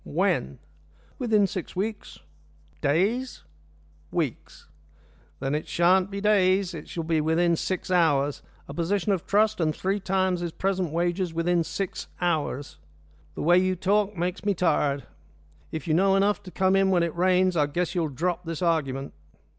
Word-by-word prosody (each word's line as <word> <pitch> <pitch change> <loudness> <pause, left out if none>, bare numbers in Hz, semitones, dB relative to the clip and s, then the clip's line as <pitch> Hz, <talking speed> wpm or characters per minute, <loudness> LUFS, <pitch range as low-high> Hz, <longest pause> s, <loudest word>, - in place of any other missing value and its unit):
"When?" 65 +2 0 0.6
"Within 220 -5 +3
six 185 -2 -5
weeks." 210 +3 -4 0.6
"Days?" 210 - 0 0.7
"Weeks." - - -4 0.7
"Then 135 - -2
it 150 - -2
shan't 185 +2 +3
be 200 0 -5
days. 195 -2 +3
It 155 -3 -8
shall 165 - -4
be 160 -1 +1
within 165 +2 +2
six 185 +2 -3
hours 145 -5 +2 0.3
a - - -7
position 195 +4 0
of 190 -4 -1
trust 215 +1 +2
and 155 -2 +1
three 195 +2 -1
times 190 -1 0
his 170 -2 -4
present 190 -4 -1
wages 175 +1 -1
within 170 0 +1
six 195 +3 -4
hours. 155 - -2 0.6
The - - -4
way 175 +3 +5
you 185 0 +1
talk 200 +2 +1
makes 180 +2 -2
me 205 -1 +1
tired. 150 -5 +1 0.7
If 160 +2 -5
you 155 - +2
know 195 +3 +4
enough 200 0 +2
to - - -8
come 190 +1 +2
in 195 0 +3
when 180 -3 +3
it 170 -1 -2
rains, 185 +1 +3
I 150 -3 +2
guess 175 +4 -2
you'll 170 -4 0
drop 175 +6 -2
this 165 0 -4
argument." 140 -5 -1
180 Hz, 160 wpm, -26 LUFS, 165-195 Hz, 0.7 s, way